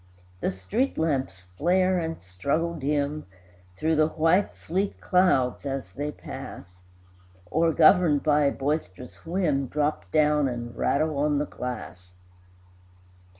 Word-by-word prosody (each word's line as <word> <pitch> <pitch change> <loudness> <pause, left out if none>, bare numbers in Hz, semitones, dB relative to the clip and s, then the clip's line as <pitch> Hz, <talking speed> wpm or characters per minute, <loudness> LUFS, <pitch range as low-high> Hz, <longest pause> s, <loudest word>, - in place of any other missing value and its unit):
The - - 0
street 200 - -2
lamps 135 - -1 0.2
flare 185 +2 +3
and 165 -1 -4
struggle 140 - -2
dim 145 - -2 0.5
Through 160 +4 +1
the 155 0 +4
white 165 +5 +2
sleet 190 +4 -2
clouds 180 -9 +2
as 135 -1 -4
they 145 +2 -4
pass, 90 -9 -10 0.7
Or, 165 +1 +3
governed 160 -2 +5
by 150 -1 +3
a 140 - +3
boisterous 135 - -4
whim, 160 -7 0
Drop 145 - -1
down 150 0 +3
and 120 -2 -5
rattle 155 0 0
on 145 0 +2
the 145 - 0
glass. 90 -10 -7
150 Hz, 125 wpm, -26 LUFS, 130-165 Hz, 0.7 s, governed